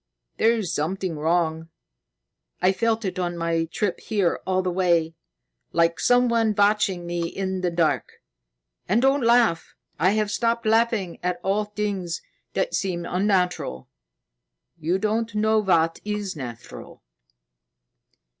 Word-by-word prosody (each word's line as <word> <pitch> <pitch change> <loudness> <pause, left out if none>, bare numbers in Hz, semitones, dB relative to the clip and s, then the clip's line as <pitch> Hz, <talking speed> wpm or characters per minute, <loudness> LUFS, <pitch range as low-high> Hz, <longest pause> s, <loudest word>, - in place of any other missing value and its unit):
There's 220 -5 +2
something 180 +3 -2
wrong. 160 +1 0 0.9
I 185 +1 +4
felt 225 +2 0
it 185 -1 -3
on 175 -1 -2
my 165 -1 0
trip 180 +3 -2
here 200 -6 0
all 185 0 +1
the 185 - -1
way, 170 -3 +2 0.6
like 170 0 +2
someone 235 -3 +3
watching 200 -3 +2
me 170 -1 -2
in 190 +1 -3
the 180 - +1
dark. 170 -2 0 0.8
And 210 +5 +3
don't 270 +1 +3
laugh! 235 -7 +2 0.2
I 185 +5 +3
have 215 -1 0
stopped 230 +1 0
laughing 220 -5 +1
at 180 0 -2
all 205 +2 +1
things 200 -5 -3 0.3
that - - -1
seem 175 -3 -2
unnatural. 180 - 0 0.9
You 165 +4 0
don't 215 +2 -1
know 220 +1 +3
what 165 -5 +2
is 210 -3 -3
natural." 120 -5 -9
190 Hz, 125 wpm, -24 LUFS, 170-215 Hz, 0.9 s, I